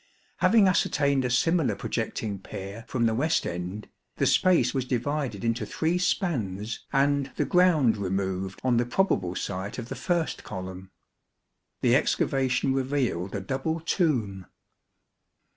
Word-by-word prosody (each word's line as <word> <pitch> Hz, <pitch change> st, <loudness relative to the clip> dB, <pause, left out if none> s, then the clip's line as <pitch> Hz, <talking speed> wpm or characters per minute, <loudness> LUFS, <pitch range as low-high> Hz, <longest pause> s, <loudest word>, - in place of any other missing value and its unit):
Having 220 Hz, -4 st, +5 dB
ascertained 140 Hz, -6 st, +2 dB
a -, -, 0 dB
similar 135 Hz, -, +2 dB
projecting 100 Hz, 0 st, -3 dB
pier 100 Hz, +4 st, -8 dB
from 120 Hz, -3 st, 0 dB
the 110 Hz, -, +2 dB
west 155 Hz, +8 st, +1 dB
end, 90 Hz, +4 st, -5 dB, 0.3 s
the -, -, +1 dB
space 185 Hz, -2 st, +3 dB
was 135 Hz, -2 st, 0 dB
divided 130 Hz, -2 st, -2 dB
into 115 Hz, +1 st, 0 dB
three 165 Hz, +3 st, -1 dB
spans 115 Hz, -, -1 dB
and 140 Hz, 0 st, +2 dB
the -, -, 0 dB
ground 165 Hz, -11 st, +4 dB
removed 95 Hz, -1 st, -2 dB
on 125 Hz, -2 st, +2 dB
the 120 Hz, -, +2 dB
probable 95 Hz, -, +1 dB
site 95 Hz, +1 st, -4 dB
of 120 Hz, -1 st, -6 dB
the -, -, -4 dB
first 175 Hz, -3 st, -1 dB
column. 95 Hz, -1 st, -7 dB, 0.9 s
The -, -, +4 dB
excavation 130 Hz, 0 st, +1 dB
revealed 130 Hz, -9 st, -1 dB
a 100 Hz, -, -2 dB
double 135 Hz, -, -2 dB
tomb. 120 Hz, -, 0 dB
125 Hz, 135 wpm, -27 LUFS, 100-150 Hz, 0.9 s, Having